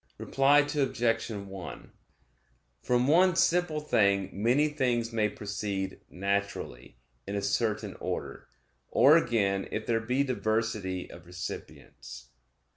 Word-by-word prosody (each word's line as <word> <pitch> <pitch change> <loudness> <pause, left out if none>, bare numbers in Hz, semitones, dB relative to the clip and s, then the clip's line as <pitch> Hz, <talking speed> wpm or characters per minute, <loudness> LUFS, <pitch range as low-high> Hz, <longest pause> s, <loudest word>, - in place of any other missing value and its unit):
Reply 145 +2 +3
Obj. 120 -5 0
1: 100 -4 -8 0.9
From 125 +1 +1
one 180 +4 +5
simple 170 -3 +2
thing 100 -9 +2
many 120 +9 +2
things 120 -5 -1
may 110 -2 +1
proceed 100 -2 -4
naturally, 100 -11 -3 0.3
in 100 - -3
a 100 - -1
certain 110 -1 -1
order; - - -5 0.4
or 145 +3 +6
again 100 -10 +1
if 110 - -3
there 115 -1 +1
be 125 +5 0
diversity 110 -7 -2
of 85 0 -13
recipients. 85 -7 -9
110 Hz, 115 wpm, -29 LUFS, 100-130 Hz, 0.9 s, or